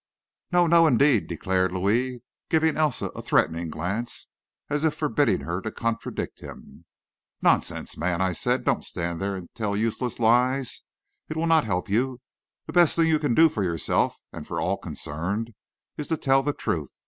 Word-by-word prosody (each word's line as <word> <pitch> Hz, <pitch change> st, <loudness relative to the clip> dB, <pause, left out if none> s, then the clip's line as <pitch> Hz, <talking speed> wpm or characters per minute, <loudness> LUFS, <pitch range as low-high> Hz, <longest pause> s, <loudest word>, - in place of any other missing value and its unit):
"No, 175 Hz, -1 st, +4 dB
no, 165 Hz, 0 st, +5 dB
indeed!" 140 Hz, -4 st, +3 dB
declared 95 Hz, +2 st, 0 dB
Louis, 115 Hz, +7 st, 0 dB, 0.3 s
giving 160 Hz, -1 st, +2 dB
Elsa 155 Hz, -4 st, 0 dB
a -, -, -8 dB
threatening 85 Hz, 0 st, +1 dB
glance, 100 Hz, +10 st, -3 dB, 0.4 s
as 145 Hz, +1 st, -1 dB
if 160 Hz, -2 st, +2 dB
forbidding 145 Hz, -1 st, +1 dB
her 85 Hz, +3 st, -3 dB
to 110 Hz, -, -4 dB
contradict 115 Hz, -1 st, -3 dB
him. -, -, -12 dB, 0.6 s
"Nonsense, -, -, +1 dB
man," 85 Hz, -1 st, -1 dB
I 95 Hz, -1 st, +1 dB
said; -, -, 0 dB
"don't -, -, +1 dB
stand 85 Hz, 0 st, -4 dB
there 100 Hz, 0 st, -1 dB
and 90 Hz, -2 st, -7 dB
tell 105 Hz, -3 st, -2 dB
useless 115 Hz, +2 st, -1 dB
lies. 125 Hz, +3 st, +2 dB, 0.5 s
It 155 Hz, -, -4 dB
will 165 Hz, -, 0 dB
not 165 Hz, -2 st, +4 dB
help 90 Hz, -4 st, -1 dB
you. 125 Hz, +5 st, 0 dB, 0.5 s
The -, -, -8 dB
best 175 Hz, -3 st, +5 dB
thing 165 Hz, -, +3 dB
you 155 Hz, -1 st, +3 dB
can 145 Hz, -6 st, 0 dB
do 165 Hz, -, +7 dB
for 110 Hz, -10 st, -2 dB
yourself 85 Hz, -3 st, 0 dB, 0.2 s
and -, -, -8 dB
for -, -, -3 dB
all -, -, 0 dB
concerned 100 Hz, +10 st, -4 dB, 0.4 s
is 150 Hz, -, -4 dB
to 160 Hz, -, 0 dB
tell 135 Hz, -2 st, +3 dB
the 145 Hz, +2 st, 0 dB
truth. 75 Hz, -, -3 dB
115 Hz, 175 wpm, -25 LUFS, 95-150 Hz, 0.6 s, do